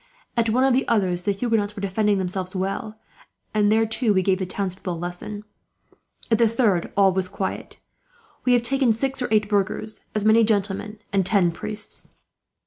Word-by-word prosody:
At 230 Hz, -2 st, +2 dB
one 250 Hz, +4 st, +2 dB
of 270 Hz, -1 st, +4 dB
the 260 Hz, -, +1 dB
others, 185 Hz, -6 st, +1 dB
the 200 Hz, -, 0 dB
Huguenots 210 Hz, -1 st, -1 dB
were 200 Hz, -, -6 dB
defending 205 Hz, +1 st, +1 dB
themselves 185 Hz, 0 st, -3 dB
well; 195 Hz, +3 st, -3 dB, 0.6 s
and 210 Hz, -1 st, +3 dB
there, 225 Hz, +1 st, +4 dB
too, 225 Hz, -1 st, +1 dB
we 190 Hz, -, +3 dB
gave 190 Hz, 0 st, +2 dB
the 185 Hz, -, -2 dB
townspeople 185 Hz, -1 st, -3 dB
a -, -, -7 dB
lesson. 175 Hz, +5 st, -6 dB, 0.9 s
At 225 Hz, -, +4 dB
the 230 Hz, -, +5 dB
third, 215 Hz, -7 st, +1 dB
all 195 Hz, -2 st, +5 dB
was 190 Hz, 0 st, 0 dB
quiet. 190 Hz, 0 st, -5 dB, 0.7 s
We 250 Hz, -, +3 dB
have 240 Hz, -1 st, +3 dB
taken 265 Hz, -1 st, +2 dB
six 270 Hz, +4 st, -2 dB
or 250 Hz, -, 0 dB
eight 215 Hz, -1 st, +2 dB
burghers, 210 Hz, +1 st, -2 dB
as 215 Hz, -1 st, +1 dB
many 220 Hz, +1 st, +6 dB
gentlemen, 210 Hz, 0 st, -1 dB, 0.2 s
and 195 Hz, -1 st, +3 dB
ten 185 Hz, -3 st, +2 dB
priests." 210 Hz, +5 st, -5 dB
210 Hz, 185 wpm, -23 LUFS, 190-225 Hz, 0.9 s, many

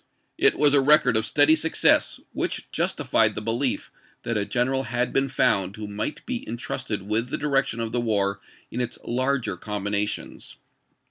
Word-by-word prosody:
It -, -, +4 dB
was 145 Hz, -1 st, +4 dB
a 140 Hz, -, +5 dB
record 135 Hz, -3 st, +4 dB
of 110 Hz, 0 st, +1 dB
steady 150 Hz, +2 st, +5 dB
success, 160 Hz, +1 st, +2 dB
which -, -, -3 dB
justified -, -, +1 dB
the -, -, -2 dB
belief 115 Hz, +5 st, -1 dB, 0.3 s
that 115 Hz, -, -2 dB
a 105 Hz, -1 st, 0 dB
general 130 Hz, +3 st, 0 dB
had 120 Hz, +2 st, -1 dB
been 135 Hz, 0 st, +2 dB
found 100 Hz, -7 st, +1 dB
who 110 Hz, -1 st, -6 dB
might 105 Hz, +8 st, -4 dB
be 255 Hz, +1 st, -2 dB
in 120 Hz, -, -6 dB
trusted 115 Hz, -5 st, -4 dB
with 110 Hz, +4 st, 0 dB
the -, -, -2 dB
direction 135 Hz, -5 st, 0 dB
of 115 Hz, -1 st, -2 dB
the 120 Hz, -, 0 dB
war 100 Hz, -3 st, 0 dB, 0.3 s
in 125 Hz, -, -2 dB
its 125 Hz, -, -4 dB
larger 130 Hz, +1 st, -1 dB
combinations. 105 Hz, 0 st, -3 dB
120 Hz, 175 wpm, -24 LUFS, 105-135 Hz, 0.3 s, a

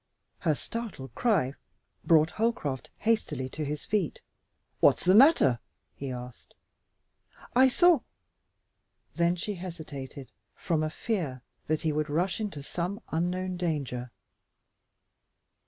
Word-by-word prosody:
Her 155 Hz, -4 st, +2 dB
startled 215 Hz, -, -6 dB
cry 195 Hz, -, +2 dB, 0.5 s
brought 160 Hz, 0 st, +5 dB
Holcroft 210 Hz, -, -1 dB
hastily 185 Hz, -, 0 dB
to 155 Hz, -, -4 dB
his 150 Hz, 0 st, -4 dB
feet. 205 Hz, -7 st, 0 dB, 0.6 s
"What's -, -, +4 dB
the 185 Hz, -, +6 dB
matter?" 210 Hz, -, +6 dB, 0.3 s
he 140 Hz, -, -6 dB
asked. 125 Hz, -1 st, -9 dB, 1.0 s
"I 260 Hz, +2 st, +7 dB
saw 345 Hz, +4 st, +5 dB, 0.6 s
" -, -, -45 dB
Then 170 Hz, +1 st, +3 dB
she 205 Hz, +4 st, -3 dB
hesitated 155 Hz, -, -8 dB, 0.2 s
from 160 Hz, -2 st, 0 dB
a 155 Hz, -, 0 dB
fear 155 Hz, -, -3 dB, 0.2 s
that 155 Hz, 0 st, 0 dB
he 160 Hz, -, +2 dB
would 150 Hz, 0 st, -1 dB
rush 175 Hz, +8 st, 0 dB
into 195 Hz, -10 st, -4 dB
some 180 Hz, +7 st, -3 dB
unknown 180 Hz, +3 st, -1 dB
danger. 140 Hz, -8 st, -2 dB
165 Hz, 120 wpm, -29 LUFS, 140-200 Hz, 1.0 s, I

